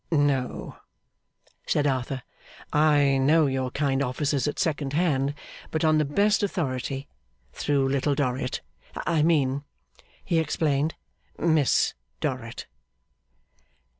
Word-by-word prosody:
'No,' 145 -5 0 0.9
said 145 - +1
Arthur, 130 -1 -1 0.5
'I 145 -3 +4
know 155 +4 +4
your 130 -2 -1
kind 140 0 0
offices 140 +2 0
at 145 - -2
second 145 -4 -1
hand, 145 -4 +1 0.3
but 160 +1 0
on 155 -1 +4
the 155 - +2
best 205 +9 +2
authority; 140 -7 -2 0.5
through 140 -2 +1
Little 140 +1 +1
Dorrit. 130 -2 -1 0.4
I 165 -2 +2
mean,' 140 -4 +2 0.6
he 165 - +2
explained, 155 -1 0 0.4
'Miss 160 -5 +3 0.3
Dorrit. 125 -5 -4
145 Hz, 105 wpm, -26 LUFS, 135-155 Hz, 0.9 s, I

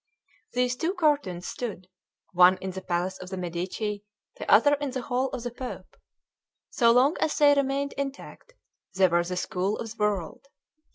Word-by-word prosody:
These 250 0 0
two 340 +8 -1
cartoons 285 - 0
stood, 200 -7 -5 0.5
one 180 +1 +6
in 190 0 -5
the 190 +1 -7
palace 180 +1 -2
of 180 - -9
the 190 - -5
Medici, 185 +4 -4 0.4
the - - -6
other 290 +7 +6
in 290 -1 -1
the 255 -1 -4
hall 255 +2 -1
of 250 -3 -6
the 245 - -4
Pope. 250 +1 -8 0.8
So 235 -2 +3
long 255 +6 +4
as 305 - 0
they 290 -1 +6
remained 280 0 0
intact, 280 - -7 0.4
they 190 0 +5
were 175 0 +2
the 180 +1 -4
school 190 +3 -1
of 225 - -6
the 215 - -2
world. 205 +4 -2
230 Hz, 175 wpm, -27 LUFS, 185-275 Hz, 0.8 s, one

